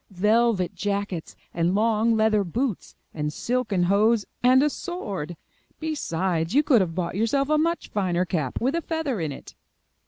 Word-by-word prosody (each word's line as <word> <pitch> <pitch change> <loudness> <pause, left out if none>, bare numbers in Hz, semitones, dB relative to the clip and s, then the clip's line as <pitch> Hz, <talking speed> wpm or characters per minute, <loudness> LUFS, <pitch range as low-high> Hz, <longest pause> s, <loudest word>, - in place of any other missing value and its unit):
Velvet 210 0 +2
jackets 200 -4 -3 0.2
and 170 +2 +1
long 225 +1 +2
leather 215 -1 +3
boots 225 +4 -3 0.2
and 150 -1 -2
silken 225 -1 -1
hose, 205 +4 +3 0.2
and 255 +2 +5
a 300 - +3
sword. 200 - -5 0.4
Besides, 185 - -1
you 295 - +5
could 260 -8 +4
have 165 -3 -2
bought 175 -2 -2
yourself 230 +8 0
a 305 0 +3
much 335 +2 -1
finer 185 -3 0
cap 155 -8 -2
with 260 +4 0
a 335 - 0
feather 320 - -2
in 155 -2 -2
it." 135 - -10
210 Hz, 160 wpm, -25 LUFS, 180-255 Hz, 0.4 s, and